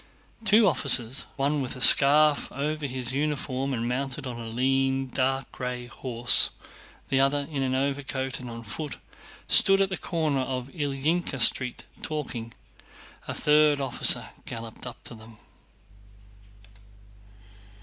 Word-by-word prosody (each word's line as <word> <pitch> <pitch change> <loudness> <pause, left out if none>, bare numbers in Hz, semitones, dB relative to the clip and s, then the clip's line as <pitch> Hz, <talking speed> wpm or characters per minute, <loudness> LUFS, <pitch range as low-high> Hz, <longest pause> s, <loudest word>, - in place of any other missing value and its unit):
Two 215 0 +4
officers, 130 -6 +3
one 140 +1 -2
with 130 -1 -5
a - - -11
scarf 145 +3 +8
over 150 +1 -4
his 130 -1 -5
uniform 140 -2 -3
and 120 -2 -3
mounted 135 +3 -4
on 120 -2 -7
a 115 - -8
lean, 135 +2 -1
dark 135 +1 -3
gray 125 -1 -6
horse, 120 -1 +2 0.6
the 135 - 0
other 140 +1 0
in 140 -3 -4
an 130 -1 -2
overcoat 135 -1 -4
and 125 -1 -9
on 115 0 -9
foot, 140 +8 -8 0.5
stood 195 0 +5
at 195 -1 +1
the 190 - -5
corner 155 -5 -3
of 130 0 -5
Ilyínka 145 +1 -3
Street, 125 +1 0 0.2
talking. 130 -7 -6 0.8
A - - -6
third 150 -1 +2
officer 135 -3 +1 0.2
galloped 115 +1 -9
up 120 - -11
to - - -9
them. 110 0 -15
135 Hz, 135 wpm, -25 LUFS, 125-145 Hz, 0.8 s, scarf